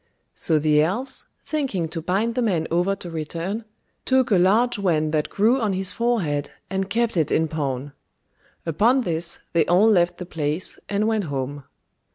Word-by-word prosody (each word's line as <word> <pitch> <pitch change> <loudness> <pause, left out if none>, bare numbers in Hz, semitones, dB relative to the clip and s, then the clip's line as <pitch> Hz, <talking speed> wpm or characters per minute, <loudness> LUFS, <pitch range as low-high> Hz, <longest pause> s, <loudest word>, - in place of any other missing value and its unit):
So 160 - +1
the 150 0 +3
elves, 220 - -1 0.2
thinking 265 - -1
to 165 0 -4
bind 195 +7 0
the 250 - -1
man 180 -9 +1
over 180 +4 +2
to 180 -2 -9
return, 170 +7 -4 0.4
took 260 -2 +2
a 190 - +5
large 215 +6 +3
wen 155 -5 +1
that 155 -1 0
grew 230 +6 +2
on 210 -3 +1
his 190 0 +1
forehead 180 -11 0 0.2
and 195 0 -1
kept 230 +1 0
it 155 -3 +1
in 160 0 +2
pawn; 140 -3 -3 0.7
upon 225 - +3
this 170 -5 -2
they 165 -2 +4
all 185 +5 +5
left 175 -4 +3
the 180 - -6
place, 155 0 -2
and 205 +1 +1
went 220 -3 0
home. 140 -1 -4
180 Hz, 175 wpm, -23 LUFS, 155-220 Hz, 0.7 s, a